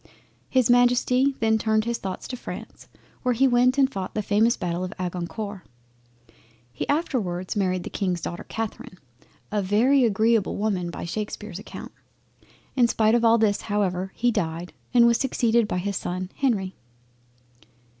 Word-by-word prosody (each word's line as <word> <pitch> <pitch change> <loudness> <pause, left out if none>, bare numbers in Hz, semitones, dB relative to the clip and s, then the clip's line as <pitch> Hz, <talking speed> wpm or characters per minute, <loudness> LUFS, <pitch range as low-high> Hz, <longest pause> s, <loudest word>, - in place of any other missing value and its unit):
His 255 -3 +3
Majesty 245 +2 +3
then 220 -1 +3
turned 220 0 +1
his 235 0 -2
thoughts 190 -1 -5
to 255 - -3
France, 250 - -9 0.3
where 250 -1 +1
he 270 +4 +4
went 250 +1 +3
and 275 -1 +5
fought 195 -8 -6
the 215 - -1
famous 220 +4 +3
Battle 175 -1 -2
of 185 - -4
Agincourt. 185 +3 -4 1.1
He 125 - -4
afterwards 225 - -1
married 185 -3 0
the - - -7
King's 185 -4 -1
daughter 175 - -5
Catherine, 220 -4 -5 0.5
a 210 -1 +1
very 235 +8 +3
agreable 220 -1 +2
woman 195 -5 -1
by 170 - -6
Shakespear's 210 0 -5
account. - - -9 0.8
In 245 -3 +5
spite 220 -1 +2
of 240 0 +3
all 230 0 +6
this 210 -2 +2
however 190 -3 -1
he 245 +1 +2
died, 175 -4 -3 0.2
and 235 -1 +6
was 235 -1 +4
succeeded 235 -4 +2
by 180 - -2
his 200 +2 -2
son 185 +1 -4
Henry. 205 -9 0
215 Hz, 155 wpm, -25 LUFS, 185-240 Hz, 1.1 s, all